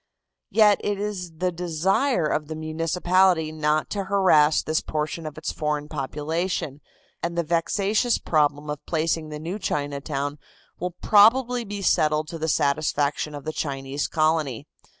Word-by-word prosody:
Yet 210 -2 +4
it 205 -1 -1
is 195 -5 -4
the 180 +2 0
desire 180 - 0
of 150 0 -1
the 160 - -5
municipality 165 +2 +1
not 155 0 0
to 200 -2 -2
harass 185 -6 +4
this 155 0 0
portion 155 +1 -3
of 150 - -8
its - - -3
foreign 150 -1 -2
population, 150 +1 -3 0.4
and 170 0 -3
the 170 - +2
vexatious 200 +8 +1
problem 150 -1 0
of 150 - -6
placing 160 -1 -1
the 150 - -6
new 170 +7 -5
Chinatown 145 -2 -3 0.4
will 180 0 -4
probably 240 +4 +5
be 205 -2 -6
settled 155 -2 +2
to 165 - -6
the 160 +1 -1
satisfaction 145 0 0
of 145 - -9
the 155 - -3
Chinese 135 -1 -3
colony. 155 -6 0
160 Hz, 150 wpm, -24 LUFS, 150-185 Hz, 0.4 s, probably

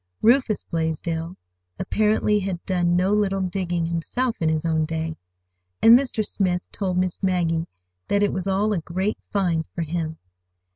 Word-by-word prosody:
Rufus 235 -2 +3
Blaisdell 165 +1 -3 0.4
apparently 210 -1 +2
had 185 -3 -4
done 175 -2 +1
no 185 +3 +2
little 195 -2 +1
"digging" 180 -2 -1
himself 195 +9 -1
in 160 - +1
his 160 +1 -1
own 160 -1 +2
day, 160 0 -3 0.6
and 230 - +8
Mr. 245 -4 +1
Smith 180 -3 -1
told 185 -3 -2
Miss 180 -1 -1
Maggie 170 -3 +1 0.4
that 205 0 +2
it 205 - +1
was 185 0 -3
all 200 +2 +1
a 190 - 0
great 185 +6 -2
"find" 175 -5 +1
for 170 - -1
him. 160 0 -3
180 Hz, 155 wpm, -24 LUFS, 165-205 Hz, 0.6 s, and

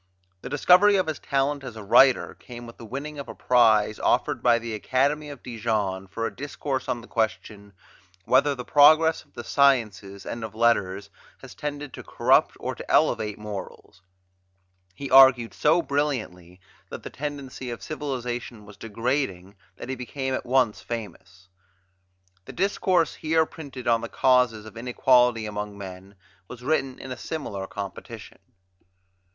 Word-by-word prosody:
The - - -7
discovery 180 +7 +5
of 185 - +2
his 155 -2 -4
talent 140 +1 -1
as 125 -4 -8
a 110 - -8
writer 130 +5 +4
came 120 -1 -11
with 115 - -12
the 115 - -11
winning 145 +5 -6
of 140 - -7
a - - -8
prize 110 -4 +3
offered 145 -5 +1
by 120 -1 +4
the 115 -1 -5
Academy 140 +7 0
of 140 -4 -10
Dijon 105 -5 -2
for 115 +4 -4
a - - -4
discourse 140 -1 -4
on 120 - -2
the 120 - -14
question, 110 -2 -3 0.5
"Whether 145 -1 +3
the 125 -1 -7
progress 155 +2 +5
of 145 - -33
the 120 - -6
sciences 110 -9 +1
and 115 - -5
of 110 -1 -7
letters 100 -4 +1 0.3
has - - -10
tended 145 -2 -6
to - - -9
corrupt - - +2
or - - -3
to - - -10
elevate 105 -2 +2
morals." 105 -3 -9 0.9
He 140 -1 -7
argued 130 -3 +7
so 170 - +2
brilliantly 110 - -3 0.3
that - - -8
the - - -8
tendency 140 -3 -6
of 120 - -7
civilization 125 -6 -5
was 100 0 -14
degrading 115 -4 -3 0.2
that - - -9
he - - -1
became 130 +1 -4
at 130 - -4
once 120 -6 +2
famous. 100 -3 -8 1.0
The - - -10
discourse 185 -3 +1
here 160 0 +1
printed 140 -6 -9
on 115 -1 +3
the 115 - -6
causes 125 -5 +2
of 110 0 -12
inequality 125 -1 +3
among 105 -1 -5
men 95 0 -10 0.3
was 125 +1 -11
written 135 -2 0
in 130 - -9
a 125 - -5
similar 100 -12 -5
competition. 100 -2 -8
120 Hz, 160 wpm, -25 LUFS, 105-140 Hz, 1.0 s, argued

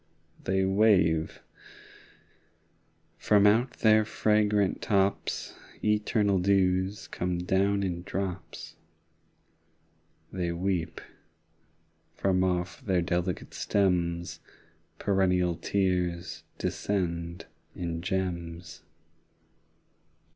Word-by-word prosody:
They 95 0 +1
wave: 95 -6 +2 1.8
from 105 -1 +4
out 115 +5 +4
their 110 -1 +5
fragrant 105 -2 +1
tops 100 -1 0 0.3
Eternal 105 -2 +2
dews 95 +1 +1
come 90 0 -2
down 100 +3 +1
in 90 -2 -2
drops. 90 -3 -5 1.5
25 95 - -7
They 85 -1 0
weep: 90 -1 -2 1.1
from 95 -1 +1
off 90 -1 -1
their 95 -4 +1
delicate 90 0 -2
stems 85 -3 0 0.6
Perennial, 90 -3 +2
tears 90 -2 -1
descend 85 -3 -2 0.3
in 85 -1 -4
gems. 85 -2 -4
95 Hz, 75 wpm, -28 LUFS, 85-100 Hz, 1.8 s, their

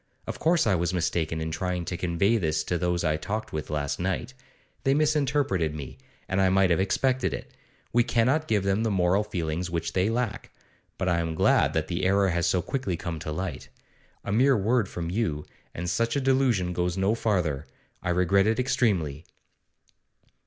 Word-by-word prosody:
Of - - -6
course 165 0 +3
I 105 - +3
was 85 0 0
mistaken 80 -2 -1
in 80 0 -3
trying 90 +1 -2
to 90 - -3
convey 90 +6 +1
this 80 -5 0
to 85 +2 -2
those 90 0 0
I 75 -2 +1
talked 105 +7 -4
with 75 -1 -4
last 75 -2 -2
night; 95 +8 -2 0.5
they 135 +1 +3
misinterpreted 140 - +1
me, 65 -3 -8 0.3
and 95 +1 +1
I 95 - +4
might 95 -1 +3
have 85 - +3
expected 130 +7 +1
it. - - -9 0.4
We 120 +1 +5
cannot 130 +8 +1
give 105 -3 +1
them 100 +2 +1
the 115 - +1
moral 95 +1 +2
feelings 90 -3 -3
which 85 -1 -3
they 95 +3 +2
lack. 115 -2 -2 0.5
But 95 - -2
I 85 -2 +2
am 80 -1 -2
glad - - +3
that 80 -1 -1
the 90 +1 -3
error 95 +1 +3
has 85 0 0
so 90 - +1
quickly 115 -11 -2
come 85 -1 -5
to 80 0 -5
light. 90 +4 -5 0.6
A - - -3
mere 130 +5 +4
word 110 +1 +1
from 85 -1 -4
you, 90 -8 -1 0.3
and 90 +1 -4
such 115 +6 0
a - - +2
delusion 130 -9 +2
goes 90 +1 -1
no 95 +3 +2
farther. 90 -11 -1 0.3
I - - -3
regret 90 +3 +3
it 110 0 +2
extremely. 90 - 0
95 Hz, 190 wpm, -26 LUFS, 85-110 Hz, 0.6 s, We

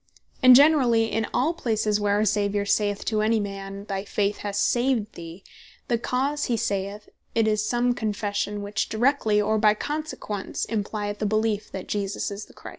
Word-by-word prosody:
And 255 -1 +9
generally 250 -6 +5
in 220 +1 -1
all 300 +7 +1
places 220 -8 0
where 205 -1 +1
our 210 +1 +2
Saviour 205 -1 0
saith 205 0 0
to 215 -1 0
any 220 +1 +2
man, 195 0 -6
"Thy 195 -2 -3
faith 205 0 -1
hath 205 -1 -5
saved 240 -2 +1
thee," 170 +2 -10 0.5
the 235 -2 +1
cause 275 +5 -1
he 235 - 0
saith 200 0 -3 0.3
it, 225 -1 +3
is 215 -1 +1
some 240 +2 +1
Confession, 205 -2 -2
which 205 +2 -2
directly, 220 -2 +2
or 215 +1 +1
by 210 0 +4
consequence, 290 -8 -4
implyeth 205 -1 -3
a 210 - +1
beleef, 215 0 0
that 190 - -6
Jesus 200 0 -2
Is 200 +1 -6
The - - -19
Christ. - - -10
210 Hz, 180 wpm, -25 LUFS, 205-230 Hz, 0.5 s, And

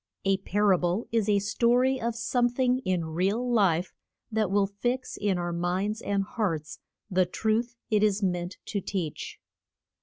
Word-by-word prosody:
A 195 0 +3
par 205 +1 +1
a 180 - +2
ble 180 +6 0
is 225 -2 +1
a 205 - +4
sto 235 +4 +2
ry 260 +1 +2
of 230 0 -1
some 240 +1 +1
thing 250 +1 +1
in 185 -8 -1
real 190 +9 0
life 190 -7 +2 0.4
that 215 -3 +1
will 200 +1 +3
fix 240 +6 -3
in 200 -3 0
our 175 0 -2
minds 185 +6 -1
and 200 -1 0
hearts 175 -8 -3 0.3
the 185 -1 +3
truth 225 +5 0 0.2
it 210 -1 +3
is 210 -1 +2
meant 180 0 -1
to 200 - -2
teach. 175 -6 -4
205 Hz, 175 wpm, -28 LUFS, 180-230 Hz, 0.4 s, a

